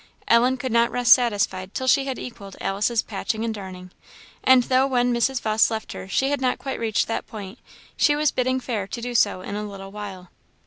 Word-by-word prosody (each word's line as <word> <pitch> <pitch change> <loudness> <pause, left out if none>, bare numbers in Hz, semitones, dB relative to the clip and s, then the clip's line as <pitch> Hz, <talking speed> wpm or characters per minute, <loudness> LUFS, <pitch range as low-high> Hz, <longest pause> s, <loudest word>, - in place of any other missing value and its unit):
Ellen 245 +3 +4
could 255 0 -4
not 235 +1 +3
rest 245 -1 +6
satisfied 200 -5 0
till 260 - -2
she 270 +1 +3
had 265 -2 -3
equalled 200 -5 -9
Alice's 210 +4 0
patching 220 +2 -3
and 225 - -2
darning; 185 -3 -9 0.5
and 260 -1 +6
though 260 +2 +2
when 245 -2 +1
Mrs. 240 +2 +1
Vawse 215 0 +3
left 220 -1 -5
her 95 0 -8
she 270 - 0
had 285 -2 -1
not 255 -1 +1
quite 265 +1 -5
reached 225 -2 0
that 225 - -3
point, 205 +1 -9 0.4
she 295 - +3
was 300 0 +2
bidding 255 +1 0
fair 220 -6 -3
to 235 - -6
do 245 +1 -5
so 205 -5 +2
in 200 - -6
a 210 - -3
little 195 -1 -9
while. 195 -3 -8
230 Hz, 215 wpm, -23 LUFS, 200-255 Hz, 0.5 s, rest